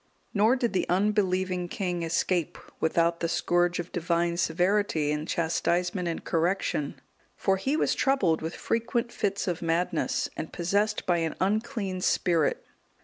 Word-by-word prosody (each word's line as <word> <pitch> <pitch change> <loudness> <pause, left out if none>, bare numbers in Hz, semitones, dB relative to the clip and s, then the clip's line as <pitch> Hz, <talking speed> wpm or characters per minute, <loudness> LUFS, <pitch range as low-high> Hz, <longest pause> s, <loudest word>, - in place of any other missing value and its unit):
Nor 220 +5 +4
did 240 -4 -1
the 185 - 0
unbelieving 185 -2 +1
king 180 -2 -2
escape 165 0 0 0.2
without 170 +1 +2
the 170 - -1
scourge 175 +1 +1
of 175 0 -5
Divine 170 0 0
severity 175 -2 +1
in 150 +1 -2
chastisement 175 +2 0
and 165 - -3
correction; 165 -3 0 0.4
for 195 - +1
he 270 +10 0
was - - +2
troubled 200 -13 +2
with 160 +2 -4
frequent 235 +1 -1
fits 200 -3 -1
of 175 -1 -2
madness, 165 0 0
and 160 - -5
possessed 205 +5 0
by 175 -1 +2
an 165 -2 -1
unclean 205 -1 -1
spirit. 170 -4 +1
180 Hz, 145 wpm, -27 LUFS, 170-200 Hz, 0.4 s, Nor